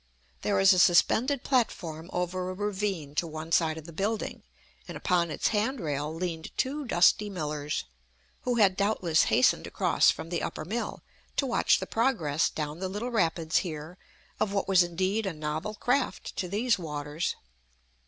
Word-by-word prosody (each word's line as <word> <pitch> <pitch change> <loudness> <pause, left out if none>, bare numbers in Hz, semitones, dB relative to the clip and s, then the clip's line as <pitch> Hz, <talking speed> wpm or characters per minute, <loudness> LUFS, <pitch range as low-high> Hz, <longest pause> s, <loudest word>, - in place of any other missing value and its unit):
There 200 -2 +1
is 195 0 +7
a 185 - +2
suspended 245 +10 +4
platform 175 - -1
over 180 +1 -2
a 185 - -5
ravine, 195 -7 -2
to 165 +3 0
one 160 +1 -7
side 160 -1 +2
of 160 - -9
the 170 - -10
building, 205 +6 -2 0.5
and - - -6
upon 175 -2 +1
its - - 0
handrail 200 - -1
leaned 165 -1 -4
two 285 +2 -1
dusty 205 0 +4
millers, 150 -5 -3 0.6
who 250 -1 0
had 200 -5 +4
doubtless 190 -5 +2
hastened - - +3
across - - +3
from 165 - -2
the 175 - -2
upper 155 - -4
mill, 225 +7 -4 0.3
to 275 - +1
watch 245 - +3
the - - -4
progress 210 - +1
down 150 +1 -4
the 190 0 -3
little 215 +6 -4
rapids 165 -6 +1
here 160 +1 -4 0.4
of 215 - +1
what 200 -1 -1
was 190 -2 +5
indeed 185 +5 0
a 190 - -2
novel 155 +7 -4
craft 255 +4 -1
to 185 - -1
these 220 +4 +1
waters. 150 0 -3
180 Hz, 165 wpm, -28 LUFS, 160-210 Hz, 0.6 s, is